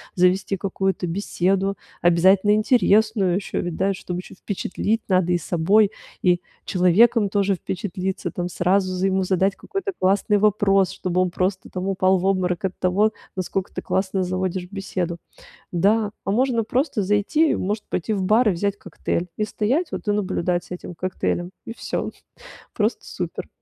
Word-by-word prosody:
завести 185 +2 +2
какую-то 190 -1 -1
беседу, 195 +2 0 0.3
обязательно 185 +4 +5
интересную 215 -3 +3
ещё 195 - -2
ведь, 175 -2 -4
да, 195 +3 +1
чтоб 180 -1 -5
ещё 180 - -8
впечатлить: 205 +3 -2
надо 185 -2 +3
и 175 - +3
собой, 190 +6 +3 0.3
и 180 -1 +3 0.3
человеком 200 +4 +4
тоже 200 0 +1
впечатлиться 185 +1 -4
там, 175 0 -3
сразу 185 +2 +1
за 185 +1 0
ему 190 0 +1
задать 190 +1 +1
какой-то 390 +1 -4
классный 200 +2 +2
вопрос, 195 -2 +3
чтобы 180 0 -2
он 185 -1 0
просто 185 +2 -2
там 185 +1 -4
упал 190 0 +3
в 180 - -3
обморок 185 -2 +1
от 190 - -3
того, 200 +4 +2 0.2
насколько 185 0 -3
ты - - -4
классно 190 0 0
заводишь 185 0 -2
беседу. 185 -3 -3 0.5
Да, 205 +5 +2 0.2
а 195 - 0
можно 240 +1 +2
просто 245 -1 0
зайти, 210 +11 +2
может 210 +3 -2
быть, 180 - -2
и - - +3
в 195 -2 -1
бар 215 +4 +4
и - - +3
взять 200 +3 -1
коктейль- 175 -2 -3
и 215 - 0
стоять 250 - -1
вот - - -6
и 205 - +3
наблюдать 180 -3 0
с - - -20
этим 180 0 -7
коктейлем. 180 0 -2
И 225 - -6
всё. - - -3 0.6
Просто - - 0
супер. - - -5
190 Hz, 165 wpm, -23 LUFS, 180-205 Hz, 0.6 s, обязательно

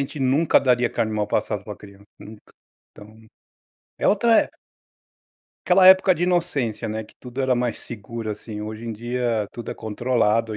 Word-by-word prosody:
gente 140 +2 -4
nunca 135 +5 +3
daria 125 -2 +2
carne 110 -1 -1
mal 105 -1 -1
passado 105 -1 -1
pra 105 - -8
criança, 100 -1 -15
nunca. 105 0 -14 0.4
Então, 105 +1 -15 0.8
é - - 0
outra 225 +3 +3
época. - - -8 1.1
Aquela 185 +1 +5
época 190 0 +7
de 175 0 -1
inocência, 145 - -1
né, 110 +1 -4
que 105 - -20
tudo 125 +1 -7
era 130 -1 +2
mais 120 -1 -2
seguro, 115 0 -7
assim. 105 0 -7
Hoje 110 +1 -7
em 115 - -4
dia, 120 -1 -2
tudo 120 - -7
é - - -5
controlado 115 -1 0
115 Hz, 170 wpm, -23 LUFS, 110-130 Hz, 1.1 s, época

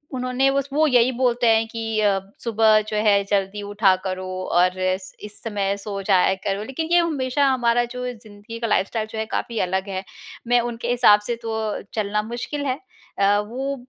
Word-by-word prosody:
उन्होंने 255 +1 +1
बस 275 0 -1
वो 310 +1 +3
यही 250 -1 +4
बोलते 245 -1 +1
हैं 225 0 +4
कि 225 -1 -3
अ, 200 -2 +3 0.2
सुबह 220 -2 +4
जो 215 - -2
है 200 -1 +4
जल्दी 200 +1 0
उठा 205 -1 +3
करो, 185 0 -3 0.3
और 180 +1 +2
इस 185 0 -2
इस 210 0 -8
समय 200 -3 -1
सो 200 0 -5
जाया 190 -1 +3
करो। 200 +1 -1
लेकिन 270 +8 -4
ये 350 - +6
हमेशा 285 -4 +1
हमारा 240 -2 +2
जो 250 0 -5
ये 250 - -3
ज़िंदगी 215 0 -11
का 230 - -2
लाइफ़स्टाइल 215 +1 0
जो 220 - -6
है, 220 - -1
काफ़ी 230 0 -3
अलग 190 +2 -2
है। 190 -1 -4 0.4
मैं 245 0 +4
उनके 230 0 -6
हिसाब 235 -4 +6
से 240 - -1
तो 225 -1 -4
अ, 215 -1 -3
चलना 210 -1 -1
मुश्किल 285 +4 -4
है। 265 +1 -1 0.4
अ, 200 +1 +4
वो 260 +7 -3
220 Hz, 200 wpm, -22 LUFS, 200-250 Hz, 0.4 s, ये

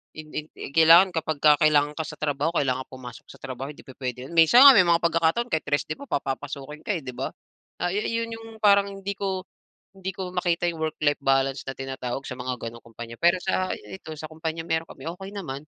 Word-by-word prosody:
In 155 -1 -10
in 150 - -3
i - - -8
kailangan 165 +4 +7
kapagka 155 -2 +3
kailangan 150 -1 +4
ka 160 - -3
sa 155 -1 -7
trabaho 145 0 0
kailangan 130 -2 +1
pumasok 130 -2 -11
sa - - -12
trabaho 135 0 -6
hindi 150 - -12
pupuwede 125 -1 -6
'yon. 155 - -10
Minsan 170 - +7
nga 280 - +12
may 210 - +7
mga 170 0 +5
pagkakataon 165 +8 +1
kahit 160 - -1
rest 145 0 +1
day 155 - -3
ka 280 - -11
papapasukin 140 +2 -4
ka, 205 - -2
eh, 160 - -9
'di 130 - -6
ba. - - -3 0.5
Ah, 175 +1 -1
ayu 205 +2 -1 0.2
'yon 230 - -10
'yong 225 0 -9 0.2
parang 200 -1 +5
hindi 195 0 -5
ko 190 -2 -3 0.5
hindi 190 -1 -5
ko 185 -2 -5
makita 175 -1 0
'yong 170 -2 -2
work-life 155 -2 0
balance 135 0 +1
na 135 - -4
tinatawag 135 -1 -4
sa - - -5
mga 125 0 -3
ganong 115 0 -8
kumpanya. 115 0 -9
Pero, 175 +2 +5
sa 185 +1 0
i 100 -2 -9
ito - - -12
sa 155 - -6
kumpanya 160 +1 -4
meron 160 -1 -1
kami, - - -11
okey 195 0 -8
naman, 140 -9 -5
155 Hz, 225 wpm, -25 LUFS, 135-180 Hz, 0.5 s, nga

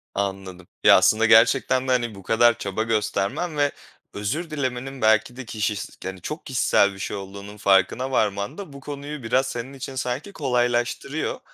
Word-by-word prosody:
Anladım. 95 -2 -4 0.2
Ya, - - +8
aslında 110 +1 +4
gerçekten 130 +3 +4
de, - - +1
hani, 120 -4 0
bu 95 - -12
kadar 115 +2 +4
çaba 100 +2 -2
göstermen 110 - -1
ve 145 -1 +2 0.4
özür 140 +12 -3
dilemenin 135 -2 -4
belki 110 +2 +3
de 130 -1 -8
kişis 105 -2 -3
hani, 95 -1 -6
çok 150 - -6
kişisel 100 -6 +2
bir 95 - -12
şey 100 - -4
olduğunun 100 +1 -9
farkına 100 +7 +2
varman 100 - 0
da 190 -8 -8
bu 140 - -9
konuyu 145 -1 -7
biraz 130 +4 +1
senin 125 +2 -5
için 135 0 -7
sanki 130 +9 -3
kolaylaştırıyor. 125 +2 -1
120 Hz, 165 wpm, -24 LUFS, 100-135 Hz, 0.4 s, Ya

